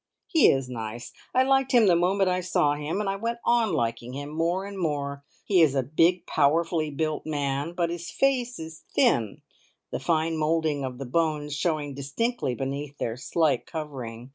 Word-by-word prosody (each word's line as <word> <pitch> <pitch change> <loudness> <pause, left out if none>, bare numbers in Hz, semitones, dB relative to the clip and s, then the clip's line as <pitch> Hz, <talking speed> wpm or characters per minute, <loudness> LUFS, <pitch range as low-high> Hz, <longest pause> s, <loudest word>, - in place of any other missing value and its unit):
He 320 - +5
is 135 -1 +1
nice! 120 -1 -6 0.2
I 255 - +4
liked 270 0 +2
him 235 -3 +6
the 180 -3 +5
moment 190 +3 +2
I 180 0 +1
saw 150 -5 +2
him, 150 +6 -3
and 210 - -2
I 195 0 -1
went 230 +3 -2
on 235 -3 +3
liking 115 +1 -2
him 145 +2 -5
more 170 +4 0
and 200 0 -7
more. 140 -5 -2 0.2
He 190 -4 +4
is 150 -4 +4
a 135 - +2
big, 165 +7 +2
powerfully 155 +2 +2
built 155 +1 -2
man, 145 +1 -2
but 170 -1 0
his 170 0 -5
face 250 -3 +1
is 160 0 -9
thin, 120 - +2 0.5
the - - -2
fine 165 -1 0
moulding 155 -2 0
of 130 -1 -4
the 135 - -5
bones 150 +1 0
showing 150 -2 -1
distinctly 140 - -2
beneath 140 +2 -4
their 115 - -2
slight 155 +5 0
covering. 130 -7 -6
155 Hz, 185 wpm, -26 LUFS, 140-180 Hz, 0.5 s, him